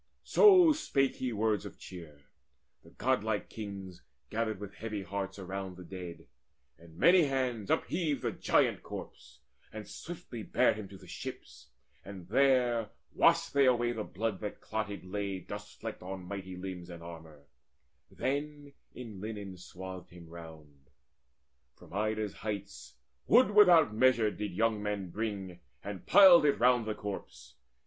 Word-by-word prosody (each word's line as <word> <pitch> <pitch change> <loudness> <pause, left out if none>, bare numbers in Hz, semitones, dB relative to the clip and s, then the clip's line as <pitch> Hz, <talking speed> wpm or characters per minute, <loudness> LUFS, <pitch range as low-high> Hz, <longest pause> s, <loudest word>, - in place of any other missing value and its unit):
So 370 -6 +7
spake 135 - 0
he 130 -1 -2
words 110 -1 0
of - - -9
cheer: 80 -5 -11 0.6
the - - -16
godlike 110 -4 -1
kings 100 -4 -8 0.3
Gathered 110 -2 -1
with 100 -1 -8
heavy 105 -1 -5
hearts 95 +1 -4
around 95 -1 -6
the 90 - -9
dead, 90 -1 -8 0.5
And 85 -1 -16
many 175 - +6
hands 130 -6 -1
upheaved 155 -7 0
the - - 0
giant - - +2
corpse, - - -10 0.3
And 110 -1 -8
swiftly 160 -8 -8
bare - - +3
him 105 -2 -7
to 100 - -11
the - - -15
ships, - - -9 0.4
and 95 -3 -10
there 125 -3 +3 0.2
Washed - - +3
they 140 -1 +5
away 120 -1 +3
the 110 -3 -3
blood 105 0 -3
that 105 -2 -6
clotted 105 -3 -4
lay 100 0 -3
Dust 90 - -9
flecked - - -6
on 95 +1 -6
mighty 95 -1 -6
limbs 90 -1 -7
and 85 -1 -9
armour: 80 -3 -11 0.7
then 145 +1 -3 0.2
In 110 -6 -8
linen 105 -3 -6
swathed 90 0 -9
him 85 -1 -13
round. 80 -5 -13 0.9
From - - -16
Ida's 110 0 -1
heights 105 -2 -6 0.3
Wood 245 0 +6
without 175 - +6
measure 115 -2 +4
did - - -13
the 105 - -1
young 105 +3 0
men 105 -3 -3
bring, 100 -4 -4 0.2
And 100 -2 -7
piled 185 -5 +9
it 145 - +3
round 125 -2 +4
the 110 - -2
corpse. 105 -1 -7
105 Hz, 150 wpm, -31 LUFS, 95-120 Hz, 0.9 s, piled